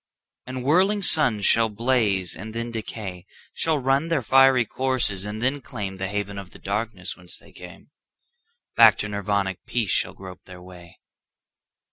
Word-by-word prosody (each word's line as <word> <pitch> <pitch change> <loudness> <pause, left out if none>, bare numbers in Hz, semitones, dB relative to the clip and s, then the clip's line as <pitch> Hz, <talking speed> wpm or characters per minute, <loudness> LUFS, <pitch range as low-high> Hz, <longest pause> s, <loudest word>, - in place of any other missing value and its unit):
And 130 0 -5
whirling 190 +8 +3
suns 125 - +2
shall 115 -1 +5
blaze 105 -5 0
and 110 +2 -9
then 115 +1 -4
decay, 100 -5 -6 0.3
Shall 160 -2 0
run 135 +3 +1
their 165 -6 0
fiery 135 0 +5
courses 125 -7 -1
and 105 +2 -5
then 135 +3 0
claimThe 95 -7 -5
haven 100 0 -4
of 95 -2 -10
the - - -15
darkness 100 -2 -4
whence 90 0 -8
they - - -17
came; - - -13 0.8
Back - - +7
to 105 - -3
Nirvanic 100 -2 -2
peace 115 -4 -1
shall - - +1
grope 95 -1 -11
their 90 -1 -12
way. 90 -1 -14
110 Hz, 155 wpm, -24 LUFS, 95-130 Hz, 0.8 s, Back